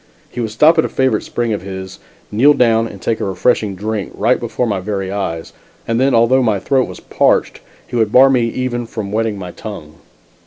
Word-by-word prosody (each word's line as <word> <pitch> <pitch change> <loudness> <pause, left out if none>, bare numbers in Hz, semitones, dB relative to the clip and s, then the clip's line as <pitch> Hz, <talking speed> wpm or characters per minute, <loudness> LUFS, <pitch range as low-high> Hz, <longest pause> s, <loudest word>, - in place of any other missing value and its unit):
He - - -7
would 115 - -2
stop 155 +10 +4
at - - +4
a - - -2
favorite 130 -5 +1
spring 120 -2 -2
of 105 - -3
his, 95 0 -8 0.3
kneel 135 +8 +5
down 115 -2 +3
and 100 - -10
take 110 +4 -1
a - - -3
refreshing 100 +1 0
drink, 105 0 -4
right - - +2
before 125 - -2
my 105 -4 -1
very 95 -1 -3
eyes, 85 -5 -4 0.3
and 115 0 0
then, 130 0 +3
although 115 +3 +4
my 110 -5 +1
throat 130 +5 +1
was - - -9
parched, - - +1 0.3
he 125 - -8
would 110 -3 +1
bar 135 +3 +6
me 120 -3 +2
even 120 0 -3
from 105 -3 -6
wetting 110 -1 -1
my 90 -2 -7
tongue. 80 -8 -9
110 Hz, 210 wpm, -17 LUFS, 100-125 Hz, 0.3 s, bar